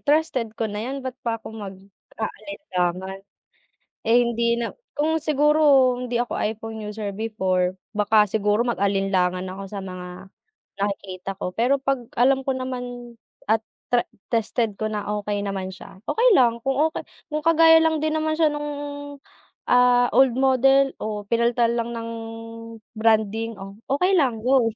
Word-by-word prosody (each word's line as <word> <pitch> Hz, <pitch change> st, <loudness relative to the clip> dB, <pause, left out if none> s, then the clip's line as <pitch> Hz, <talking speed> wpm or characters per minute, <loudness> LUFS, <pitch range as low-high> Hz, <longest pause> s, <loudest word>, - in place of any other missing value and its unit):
trusted 290 Hz, -6 st, +1 dB
ko 225 Hz, -, -1 dB
na 210 Hz, -1 st, -3 dB
yan 270 Hz, 0 st, -5 dB
ba't 260 Hz, -, -3 dB
pa 230 Hz, -1 st, -1 dB
ako 220 Hz, -, -10 dB
mag-aalinlangan. 195 Hz, -, -5 dB, 0.8 s
Eh, 225 Hz, +1 st, +4 dB
hindi 235 Hz, 0 st, +1 dB
na 230 Hz, -, -1 dB, 0.2 s
kung 310 Hz, +2 st, +1 dB
siguro 295 Hz, -4 st, +4 dB
hindi 245 Hz, -1 st, -2 dB
ako 245 Hz, -, -2 dB
iPhone 220 Hz, 0 st, -4 dB
user 210 Hz, 0 st, -5 dB
before 190 Hz, -5 st, 0 dB, 0.2 s
baka 210 Hz, 0 st, +4 dB
siguro 210 Hz, +1 st, +1 dB
mag-alinlangan 195 Hz, -5 st, 0 dB
ako 190 Hz, +2 st, -7 dB
sa 195 Hz, +1 st, -6 dB
mga 185 Hz, 0 st, -8 dB, 0.5 s
nakikita 195 Hz, -2 st, -4 dB
ko, 180 Hz, -, -3 dB
pero 260 Hz, +4 st, +2 dB
'pag 270 Hz, -2 st, -1 dB, 0.2 s
alam 265 Hz, +2 st, +4 dB
ko 270 Hz, -, +1 dB
naman 245 Hz, -2 st, -6 dB, 0.3 s
at 220 Hz, +1 st, +2 dB, 0.2 s
tre 245 Hz, -1 st, +2 dB, 0.2 s
tested 225 Hz, -2 st, 0 dB
ko 215 Hz, +1 st, -3 dB
na 210 Hz, -1 st, -3 dB
okay 210 Hz, 0 st, -2 dB
naman 195 Hz, -2 st, -4 dB
siya, 190 Hz, +1 st, -12 dB
okay 470 Hz, -, +3 dB
lang 235 Hz, -2 st, +3 dB
kung 270 Hz, +2 st, -1 dB
okay 320 Hz, -, -6 dB, 0.3 s
kung 305 Hz, -, 0 dB
kagaya 325 Hz, 0 st, +7 dB
lang 320 Hz, 0 st, +2 dB
din 310 Hz, 0 st, 0 dB
naman 310 Hz, 0 st, 0 dB
siya 315 Hz, -2 st, +3 dB
nung, 295 Hz, 0 st, -4 dB, 1.0 s
ah, 245 Hz, 0 st, +5 dB
old 260 Hz, -3 st, +4 dB
model 270 Hz, +1 st, +4 dB
o 210 Hz, -1 st, -4 dB
pinalitan 235 Hz, +1 st, +2 dB
lang 235 Hz, 0 st, -4 dB
ng 230 Hz, 0 st, -5 dB, 0.8 s
branding, 220 Hz, 0 st, +1 dB
oh, 195 Hz, 0 st, -9 dB
okay 360 Hz, +8 st, +2 dB
lang, 255 Hz, -9 st, +2 dB
go. 255 Hz, -2 st, +4 dB
230 Hz, 150 wpm, -23 LUFS, 205-265 Hz, 1.0 s, kagaya